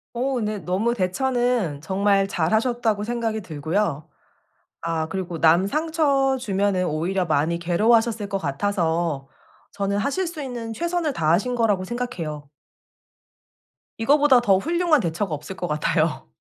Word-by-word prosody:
오 255 Hz, +1 st, -1 dB
네. 210 Hz, -1 st, -2 dB
너무 195 Hz, +6 st, 0 dB
대처는 240 Hz, -, 0 dB
정말 195 Hz, +3 st, +2 dB
잘하셨다고 220 Hz, +4 st, 0 dB
생각이 230 Hz, -1 st, -2 dB
들고요. 160 Hz, -1 st, -2 dB, 0.7 s
아 165 Hz, -1 st, -2 dB
그리고 175 Hz, -2 st, -4 dB
남 170 Hz, +4 st, +5 dB
상처주면은 265 Hz, -, +1 dB
오히려 175 Hz, +4 st, -1 dB
많이 160 Hz, +1 st, +1 dB
괴로워하셨을 215 Hz, +5 st, +2 dB
것 195 Hz, -, -1 dB
같아서 165 Hz, -3 st, -1 dB, 0.4 s
저는 200 Hz, 0 st, -1 dB
하실 285 Hz, -, -1 dB
수 330 Hz, -2 st, -7 dB
있는 240 Hz, -4 st, -5 dB
최선을 340 Hz, +3 st, -1 dB
다하신 175 Hz, +10 st, +1 dB
거라고 210 Hz, -5 st, +2 dB
생각해요. 175 Hz, -, -5 dB, 1.5 s
이거보다 280 Hz, +2 st, +5 dB
더 195 Hz, -5 st, +4 dB
훌륭한 335 Hz, -, +2 dB
대처가 170 Hz, 0 st, -2 dB
없을 150 Hz, +6 st, -8 dB
것 180 Hz, -, -4 dB
같아요. 155 Hz, +1 st, 0 dB
200 Hz, 300 characters per minute, -23 LUFS, 170-245 Hz, 1.5 s, 남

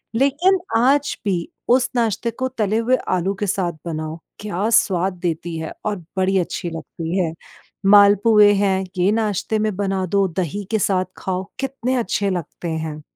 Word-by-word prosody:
लेकिन 295 Hz, +10 st, +3 dB, 0.2 s
आज 275 Hz, +5 st, +2 dB
भी 180 Hz, -4 st, 0 dB, 0.2 s
उस 250 Hz, +1 st, +4 dB
नाश्ते 230 Hz, 0 st, 0 dB
को 260 Hz, +3 st, -2 dB
तले 220 Hz, -4 st, -1 dB
हुए 235 Hz, +3 st, +3 dB
आलू 185 Hz, +2 st, +1 dB
के 205 Hz, -, -1 dB
साथ 180 Hz, -3 st, 0 dB
बनाओ 155 Hz, -1 st, -4 dB, 0.2 s
क्या 205 Hz, +1 st, -2 dB
स्वाद 190 Hz, -4 st, +2 dB
देती 170 Hz, -1 st, -2 dB
है 160 Hz, -, -5 dB
और 210 Hz, -2 st, -1 dB, 0.2 s
बड़ी 190 Hz, +1 st, +2 dB
अच्छी 175 Hz, 0 st, -3 dB
लगती 165 Hz, +1 st, -5 dB
है। 165 Hz, -3 st, 0 dB, 0.5 s
मालपुए 205 Hz, +1 st, +6 dB
हैं, 195 Hz, -1 st, +1 dB
ये 185 Hz, +3 st, +3 dB
नाश्ते 215 Hz, -1 st, 0 dB
में 215 Hz, -2 st, 0 dB
बना 195 Hz, -1 st, -1 dB
दो 195 Hz, +2 st, +2 dB
दही 185 Hz, +2 st, -3 dB
के 220 Hz, -, +2 dB
साथ 185 Hz, -2 st, +1 dB
खाओ 185 Hz, 0 st, -3 dB, 0.2 s
कितने 260 Hz, -1 st, -2 dB
अच्छे 205 Hz, -3 st, 0 dB
लगते 175 Hz, -1 st, -4 dB
हैं। 160 Hz, -1 st, -4 dB
195 Hz, 165 wpm, -21 LUFS, 180-225 Hz, 0.5 s, मालपुए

